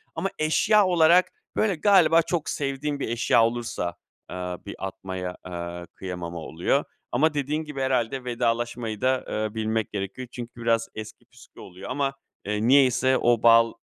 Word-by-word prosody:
ama 195 - -1
eşya 200 +7 +4
olarak, 175 0 +4 0.2
böyle, 210 -4 +2
galiba 170 -2 +5
çok 165 -1 -2
sevdiğim 140 +1 -2
bir - - -2
eşya 115 0 +3
olursa, 115 -7 -3 0.3
eee, - - -7 0.3
bir 100 - -7
atmaya, 95 -1 -6
eee, 85 0 -6
kıyamama 90 -2 -6
oluyor 85 - 0 0.3
ama 150 +6 +2
dediğin 150 +2 -1
gibi, 150 -3 -6
herhâlde 130 -1 0
vedalaşmayı 120 -2 -2
da, 130 0 +1
eee, 110 0 -2
bilmek 110 0 -1
gerekiyor 100 +5 -5
çünkü 120 -1 -8
biraz 115 -1 +1
eski 110 0 -9
püskü - - -18
oluyor 90 0 -10
ama, 140 -1 -1 0.3
eee, 105 +2 -1
niyeyse 130 -1 +4
o 120 -2 +2
bal 115 0 +6
120 Hz, 150 wpm, -25 LUFS, 105-145 Hz, 0.3 s, bal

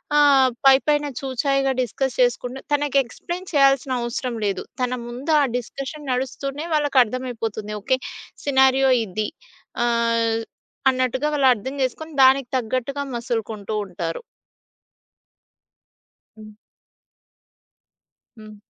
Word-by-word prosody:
ఆహ్, 290 -2 +6 0.2
పైపైన 290 +2 +5
చూచాయిగా 270 +1 0
డిస్కస్ 255 +2 -2
చేసుకుండం, 245 +1 0
తనకి 290 -1 +1
ఎక్స్‌ప్లెయిన్ 350 +9 -7
చేయాల్సిన 275 -2 +4
అవసరం 240 +1 -3
లేదు. 200 -1 -1 0.2
తన 250 0 0 0.2
ముందు 255 +6 -4
ఆ - - +4
డిస్కషన్ 275 +4 -7
నడుస్తూనే 275 +3 -3
వాళ్ళకర్థమైపోతుంది. 245 -6 0
ఓకే. 260 +5 +1 0.5
సినారియో 265 -1 +4
ఇది, 210 +2 -3 0.6
ఆహ్, 230 -1 +1 0.5
అన్నట్టుగా 255 +2 0
వాళ్ళర్థం 260 -2 +2
జేసుకొని, 315 +5 -4
దానికి 265 -1 +5
తగ్గట్టుగా 255 +4 -2
మసులుకుంటూ 225 -3 -3
ఉంటారు. 170 -3 -5 2.2
హ్మ్. 215 -1 -12 1.8
హ్మ్. 215 0 -12
255 Hz, 95 wpm, -22 LUFS, 235-275 Hz, 2.2 s, ఆహ్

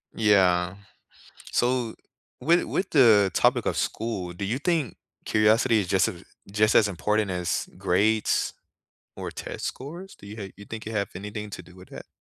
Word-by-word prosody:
Yeah, 95 -4 +3 0.8
so, 120 -2 +1 0.5
with 170 +6 +3
with 190 - -2
the 110 -9 +6
topic - - +2
of - - 0
school, 105 -6 -3
do 95 +3 -6
you 115 +7 -1
think 165 -4 -1 0.3
curiosity 110 +2 +3
is 90 - -4
just 95 +1 +3
a 90 -3 -8 0.3
just 105 +2 +2
as 105 - +6
important 105 +2 0
as 90 -2 -2
grades, 105 +4 +1 0.6
or - - -5
test - - -6
scores? 170 +9 -7
Do - - -16
you 105 - -8
ha 105 - -5
do - - -17
you 100 - -11
think 110 0 -7
it - - -4
have 100 -1 -1
anything 105 +2 -6
to 90 - -7
do 90 +1 -17
with 90 0 -15
that? - - -10
105 Hz, 175 wpm, -26 LUFS, 95-115 Hz, 0.8 s, the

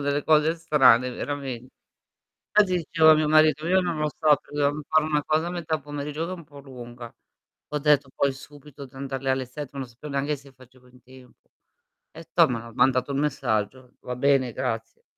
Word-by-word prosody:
delle 145 +1 -1
cose 155 +1 +3
strane 135 -7 +4
verame 130 -3 -5 0.9
fatti 205 -3 +3
dicevo 160 -1 +4
a - - +9
mio 155 0 +1
marito: 155 0 +4
"Io 190 +1 +4
non 175 -3 -2
lo 150 0 0
so, 155 - -5
perché - - -19
dovevam 145 +1 0
fare 155 -1 +3
una 150 -2 0
cosa 155 +2 0
a - - -3
metà 160 -3 -3
pomeriggio 145 +2 -5
che 180 - -6
è - - -3
un 170 - -12
po' 145 -1 -15
lunga." 120 -3 -11 0.6
Ho 150 - -2
detto 145 -2 +2
poi 140 -1 +1
subito 145 +1 -13
di 135 0 -19
andar 135 -1 -5
lì 135 - -2
alle 130 -1 0
7, 140 +1 -9
non 135 -2 -5
sapevo 135 +5 -10
neanche 140 +2 -1
se 140 -1 -16
facevo 130 0 -20
in 125 0 -21
tempo. 130 0 -19 0.6
E - - -12
toh - - +5
ma 115 -1 -5
mandato 130 +2 +2
il 135 - -2
messaggio: 125 -3 -2
"Va 125 - -6
bene 135 -1 +2
grazie." 115 +1 -4
140 Hz, 200 wpm, -25 LUFS, 130-150 Hz, 0.9 s, a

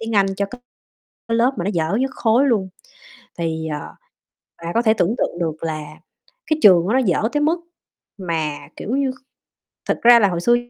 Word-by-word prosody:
tiếng 225 0 -5
Anh 195 - +4
cho 200 - -1
cái 245 +4 -11 0.7
lớp 230 +3 +3
mà 175 - -2
nó 200 - 0
dở 165 +2 0
nhất 265 0 -1
khối 240 +5 +2
luôn. 200 -6 +1 0.7
Thì, 160 -1 -2
à, 150 - -5 0.7
bà 170 +1 -4
có 230 - +2
thể 220 -2 +3
tưởng 210 +3 +1
tượng 175 - -2
được 160 -2 -3
là 155 -2 -3 0.6
cái 310 -1 0
trường 180 -4 +7
đó - - +1
nó - - +4
dở 195 -5 +1
tới 295 - 0
mức 330 +3 +1 0.6
mà, 160 -5 -2 0.2
kiểu 240 +6 -3
như 275 -1 +1 0.8
thực - - 0
ra 235 0 +8
là 200 - +4
hồi 175 -2 -3
xưa 240 +5 +4
200 Hz, 195 wpm, -20 LUFS, 170-240 Hz, 0.8 s, ra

